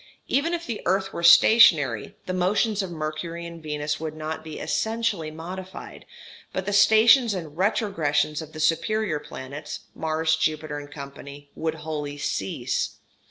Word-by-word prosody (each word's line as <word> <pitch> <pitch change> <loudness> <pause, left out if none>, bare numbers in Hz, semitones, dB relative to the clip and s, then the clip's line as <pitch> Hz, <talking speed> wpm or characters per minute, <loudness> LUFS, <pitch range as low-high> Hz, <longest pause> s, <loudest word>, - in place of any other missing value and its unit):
Even 330 +5 +1
if 340 0 -6
the 230 -3 -4
earth 190 +1 +1
were - - -4
stationary, 160 - +6
the 185 - -3
motions 205 +4 +1
of 190 - -4
Mercury 165 +1 -5
and 170 -1 -9
Venus 150 -1 -3
would 155 -1 -5
not 155 0 -5
be 160 -1 -8
essentially 220 -7 -1
modified, 180 +4 -9 0.4
but 185 - -3
the 205 - -2
stations 220 +3 +6
and 160 -5 -6
retrogressions 165 -6 0
of 155 -1 -9
the 155 - -8
superior 165 +2 +1
planets, 145 +2 -8
Mars, 160 0 0
Jupiter, 155 -2 -2
&c., 140 0 -10
would 160 0 -2
wholly 150 -2 -5
cease. 95 -8 -2
160 Hz, 145 wpm, -25 LUFS, 150-195 Hz, 0.4 s, stationary